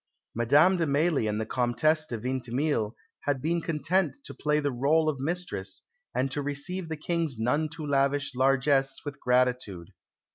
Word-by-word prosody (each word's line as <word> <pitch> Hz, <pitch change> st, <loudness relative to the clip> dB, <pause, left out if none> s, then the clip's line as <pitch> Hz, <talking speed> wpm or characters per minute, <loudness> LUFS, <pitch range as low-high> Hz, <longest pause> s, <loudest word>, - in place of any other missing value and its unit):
Madame 145 Hz, +11 st, +4 dB
de 165 Hz, -2 st, +1 dB
Mailly 145 Hz, -3 st, +2 dB
and 105 Hz, 0 st, -1 dB
the 110 Hz, -, -1 dB
Comtesse 150 Hz, +7 st, +1 dB
de 120 Hz, -, -4 dB
Vintimille 125 Hz, 0 st, -1 dB, 0.3 s
had 145 Hz, -2 st, +1 dB
been 165 Hz, +5 st, 0 dB
content 165 Hz, -, 0 dB
to -, -, -7 dB
play 150 Hz, 0 st, +1 dB
the 145 Hz, -1 st, 0 dB
rôle 150 Hz, +6 st, +2 dB
of 150 Hz, -4 st, 0 dB
mistress, 145 Hz, -, -3 dB, 0.3 s
and 135 Hz, +1 st, 0 dB
to 145 Hz, -, -1 dB
receive 145 Hz, +5 st, -4 dB
the 160 Hz, -, -3 dB
King's 160 Hz, -4 st, -2 dB
none 145 Hz, +8 st, +1 dB
too 155 Hz, 0 st, -7 dB
lavish 140 Hz, 0 st, +1 dB
largesse 135 Hz, +1 st, +2 dB
with 145 Hz, -1 st, -6 dB
gratitude. 125 Hz, -8 st, +1 dB
140 Hz, 160 wpm, -28 LUFS, 125-155 Hz, 0.3 s, Madame